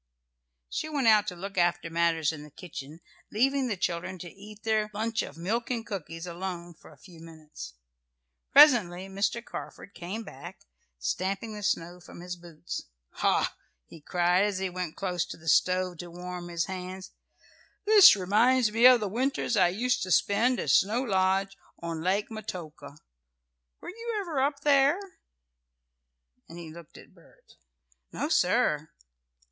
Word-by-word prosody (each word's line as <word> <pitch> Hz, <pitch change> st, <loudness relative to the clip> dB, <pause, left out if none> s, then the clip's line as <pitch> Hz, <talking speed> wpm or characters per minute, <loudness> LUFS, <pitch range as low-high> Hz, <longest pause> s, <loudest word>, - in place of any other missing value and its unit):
She 310 Hz, -, -4 dB
went 285 Hz, -4 st, -1 dB
out 215 Hz, -2 st, +5 dB
to 180 Hz, -, -4 dB
look 195 Hz, +2 st, -5 dB
after 175 Hz, -1 st, +1 dB
matters 165 Hz, -2 st, +1 dB
in 155 Hz, -2 st, -8 dB
the 150 Hz, -, -12 dB
kitchen, 155 Hz, -1 st, -10 dB, 0.3 s
leaving 265 Hz, +4 st, +1 dB
the 210 Hz, -5 st, -2 dB
children 175 Hz, +2 st, -2 dB
to 175 Hz, -1 st, -9 dB
eat 210 Hz, +2 st, -13 dB
their 215 Hz, -1 st, +1 dB
lunch 220 Hz, +1 st, -1 dB
of 145 Hz, -, -8 dB
milk 220 Hz, +8 st, -2 dB
and 235 Hz, -3 st, -2 dB
cookies 165 Hz, -4 st, -6 dB
alone 175 Hz, 0 st, -6 dB
for -, -, -17 dB
a -, -, -17 dB
few 175 Hz, -4 st, -15 dB
minutes. 155 Hz, -, -11 dB, 0.8 s
Presently 190 Hz, -, +6 dB
Mr. 200 Hz, +5 st, -2 dB
Carford 200 Hz, -, -9 dB
came 195 Hz, +6 st, -6 dB
back, 175 Hz, +3 st, -11 dB, 0.4 s
stamping 195 Hz, -, -3 dB
the 210 Hz, -, -7 dB
snow 175 Hz, -3 st, -2 dB
from 175 Hz, -, -13 dB
his 180 Hz, 0 st, -6 dB
boots. 170 Hz, -1 st, -8 dB, 0.3 s
"Ha!" -, -, +1 dB, 0.3 s
he 160 Hz, -, -14 dB
cried, 180 Hz, +4 st, +2 dB
as 205 Hz, -2 st, 0 dB
he 190 Hz, -1 st, -2 dB
went 180 Hz, -3 st, -5 dB
close 180 Hz, -3 st, -1 dB
to -, -, -8 dB
the 165 Hz, 0 st, -15 dB
stove 180 Hz, +2 st, +2 dB
to 175 Hz, -, -7 dB
warm 180 Hz, 0 st, -7 dB
his 170 Hz, -1 st, -1 dB
hands. 185 Hz, 0 st, -7 dB, 0.7 s
"This 420 Hz, -, +9 dB
reminds 215 Hz, +5 st, +3 dB
me 230 Hz, +3 st, +7 dB
of 250 Hz, -2 st, +6 dB
the 210 Hz, -, -1 dB
winters 245 Hz, +3 st, -1 dB
I 185 Hz, -4 st, +5 dB
used 245 Hz, +7 st, 0 dB
to 185 Hz, -, -3 dB
spend 230 Hz, +7 st, +2 dB
at -, -, 0 dB
Snow 225 Hz, +6 st, +3 dB
Lodge 195 Hz, -2 st, +1 dB, 0.2 s
on 165 Hz, -1 st, -5 dB
Lake 195 Hz, +6 st, 0 dB
Metoka. 160 Hz, -9 st, -8 dB, 0.8 s
Were -, -, -9 dB
you 460 Hz, +3 st, -5 dB
ever 330 Hz, -9 st, -2 dB
up 280 Hz, +1 st, 0 dB
there?" 280 Hz, +2 st, +4 dB, 1.5 s
and 165 Hz, -, -10 dB
he 165 Hz, -2 st, -9 dB
looked 170 Hz, -2 st, -13 dB
at -, -, -16 dB
Bert. -, -, -22 dB, 0.6 s
"No, -, -, -3 dB
sir." -, -, +2 dB
185 Hz, 160 wpm, -28 LUFS, 170-225 Hz, 1.5 s, This